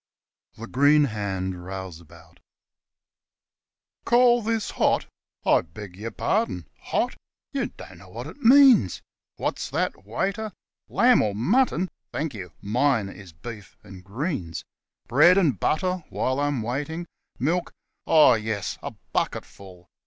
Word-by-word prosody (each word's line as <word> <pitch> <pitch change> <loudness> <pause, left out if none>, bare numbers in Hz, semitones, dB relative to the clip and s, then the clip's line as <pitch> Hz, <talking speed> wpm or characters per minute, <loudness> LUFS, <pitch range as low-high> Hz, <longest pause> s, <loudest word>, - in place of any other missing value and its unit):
THE 115 - -8
GREEN 145 +5 +4
HAND 95 -6 -3
ROUSEABOUT 85 -3 -10 1.6
CALL 240 0 +5
this 225 -1 -1
hot? - - +1 0.4
I - - +5
beg 90 +3 -11
your 110 +4 -5
pardon. 195 - -1 0.2
Hot! - - 0 0.4
you - - 0
don't 90 -2 -13
know 95 +1 -15
what 115 +6 -7
it - - -9
means. 255 - +6 0.3
(What's - - -3
that, - - -2
waiter 195 - -3 0.3
1? - - -14
lamb 250 -1 +6
or 105 -2 -1
mutton! 190 - +2 0.2
Thank 150 -2 -3
you 95 -5 -8
mine 115 0 +1
is 95 -2 -12
beef 105 +5 -10
and 95 -3 -12
greens. 100 - -4 0.4
Bread 155 - +6
and 150 - +2
butter 180 +2 0
while 130 +1 -1
I'm 145 -5 0
waiting. 145 +8 -3 0.3
Milk? 170 +7 0 0.4
Oh, 155 -2 +7
yes 110 -2 -3
a - - -6 0.2
bucketful.) 90 -3 -4
115 Hz, 130 wpm, -25 LUFS, -, 1.6 s, Oh